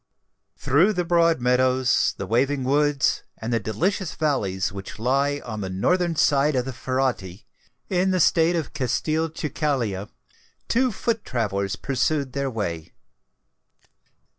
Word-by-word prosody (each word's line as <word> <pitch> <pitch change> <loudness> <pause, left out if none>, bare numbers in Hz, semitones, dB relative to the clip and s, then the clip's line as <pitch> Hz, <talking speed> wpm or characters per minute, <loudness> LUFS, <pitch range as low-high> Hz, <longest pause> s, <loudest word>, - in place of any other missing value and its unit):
Through 165 +11 +3
the 180 -2 -1
broad 170 -3 +3
meadows, 125 0 +2
the - - -4
waving 135 +4 +1
woods, 145 +1 +2 0.2
and 115 +2 -4
the 115 - +2
delicious 165 - -2
valleys 105 -13 0
which 100 0 -8
lie 140 +5 0
on 110 -3 -5
the 95 - -4
northern 170 - +1
side 145 0 +3
of 125 -1 0
the 130 - -5
Ferretti, 125 -8 -2 0.4
in 185 0 +1
the 185 -1 +1
State 165 +1 +3
of 165 -3 -3
Castelcicala, 145 -6 -1 0.6
two 255 +1 +2
foot 225 +1 -2
travellers 100 -4 -2
pursued 135 +3 -1
their 140 -1 -1
way. 85 -9 -4
135 Hz, 130 wpm, -24 LUFS, 115-160 Hz, 0.6 s, Through